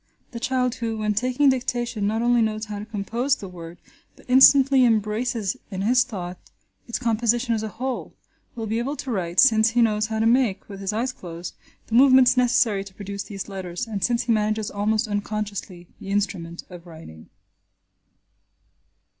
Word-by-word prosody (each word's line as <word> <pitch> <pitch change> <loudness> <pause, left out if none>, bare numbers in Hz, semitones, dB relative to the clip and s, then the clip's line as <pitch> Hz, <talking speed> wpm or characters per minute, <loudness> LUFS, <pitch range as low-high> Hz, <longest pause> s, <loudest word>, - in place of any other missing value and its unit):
The 235 - -6
child 250 0 0
who, 225 -1 -2
when 215 -1 0
taking 255 +6 +2
dictation, 240 -4 -1
not 220 +2 -1
only 240 0 +3
knows 215 0 -1
how 210 -1 -6
to 210 - -7
compose 230 +5 -1
the 200 - -9
word, 170 -1 -10 0.4
but - - -20
instantly 265 +1 +6
embraces 220 -1 0
in 190 0 -4
his 245 +4 +4
thought 185 -8 -7 0.5
its 235 - -2
composition 235 0 0
as 220 - -1
a 220 - -3
whole, 250 +5 -5 0.4
will 225 -2 -4
be 220 +2 -1
able 270 +5 -2
to 270 - -6
write, 180 -4 -1
since 220 -4 +5
he 240 +1 +1
knows 210 -1 +1
how 220 0 -3
to 220 - +1
make, 230 -5 +2
with 195 -2 -9
his 195 0 -2
eyes 240 +4 -2
closed, 170 -1 -8 0.3
the - - -10
movements 260 0 +6
necessary 240 -5 +2
to 190 -1 -14
produce 200 0 -6
these 195 -2 -7
letters, 190 +1 -5
and 210 -5 -5
since 240 +2 +1
he 235 - -1
manages 215 0 0
almost 210 +2 0
unconsciously 205 -3 -4
the 195 - -9
instrument 180 -4 -2
of 175 -1 -12
writing. 160 - -13
220 Hz, 180 wpm, -23 LUFS, 200-245 Hz, 0.5 s, instantly